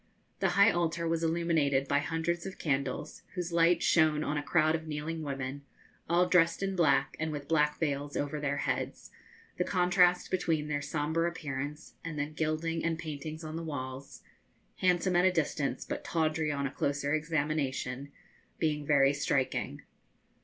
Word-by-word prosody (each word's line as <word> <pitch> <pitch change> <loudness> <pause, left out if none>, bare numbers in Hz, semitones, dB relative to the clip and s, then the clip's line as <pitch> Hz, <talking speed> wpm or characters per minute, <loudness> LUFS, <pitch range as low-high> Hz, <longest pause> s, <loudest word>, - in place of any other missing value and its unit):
The - - +2
high 200 +3 +7
altar 170 -1 0
was 165 0 0
illuminated 160 -5 +1
by 145 - +3
hundreds 165 +4 -2
of 190 - -8
candles, 140 0 -2
whose 175 -2 -3
light 170 0 +4
shone 155 -2 +4
on 150 - -1
a 150 - 0
crowd 155 0 +2
of 160 0 -3
kneeling 155 +2 -4
women, 135 -1 -4 0.5
all 175 +1 +4
dressed 175 +1 +3
in 195 0 -1
black, 155 -6 +3
and 160 0 -1
with 145 -2 -6
black 150 -2 +2
veils 145 -2 -1
over 145 +1 -2
their 145 -1 -1
heads, - - -3 0.5
the - - +3
contrast 180 -1 +3
between 160 -5 0
their 145 -1 -1
sombre 160 +3 0
appearance 150 -2 -5
and 165 -2 -5
the 145 - 0
gilding 155 +2 -2
and 165 -1 0
paintings 155 0 -6
on 155 0 -6
the 165 - -3
walls 135 -3 -6 0.5
handsome 180 0 +2
at 175 +1 +5
a 185 - +5
distance, 150 -4 -1
but - - -4
tawdry 155 -1 0
on 140 -1 -2
a 135 - -2
closer 140 +1 -1
examination 145 -4 -1 0.5
being 150 -2 0
very 140 -2 +5
striking. 140 -2 -1
155 Hz, 165 wpm, -31 LUFS, 145-165 Hz, 0.5 s, high